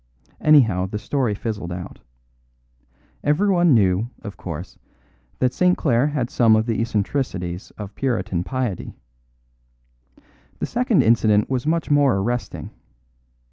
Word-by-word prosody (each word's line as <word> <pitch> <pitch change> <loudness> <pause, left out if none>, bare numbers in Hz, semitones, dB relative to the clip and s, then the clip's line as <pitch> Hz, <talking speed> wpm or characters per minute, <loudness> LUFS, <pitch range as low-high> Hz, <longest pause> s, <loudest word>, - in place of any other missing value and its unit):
"Anyhow, 115 -12 +4
the 105 - -4
story 110 +1 -1
fizzled 100 -5 -5
out. 90 0 -7 1.2
Everyone 175 0 +3
knew, 100 +1 +2
of 100 -3 -7
course, 85 +1 -8 0.6
that 125 -1 +1
St. 180 0 +2
Clare 125 -1 +2
had 140 -5 -2
some 115 -3 +4
of 110 0 +1
the 115 -1 -1
eccentricities 100 -5 -2
of 105 -1 -7
puritan 95 -10 -1
piety. 125 -4 -4 1.6
The - - -2
second 240 -5 +2
incident 110 -1 +3
was 130 +2 -1
much 165 -1 0
more 145 -4 +4
arresting. 120 +5 -3
115 Hz, 120 wpm, -22 LUFS, 100-140 Hz, 1.6 s, Anyhow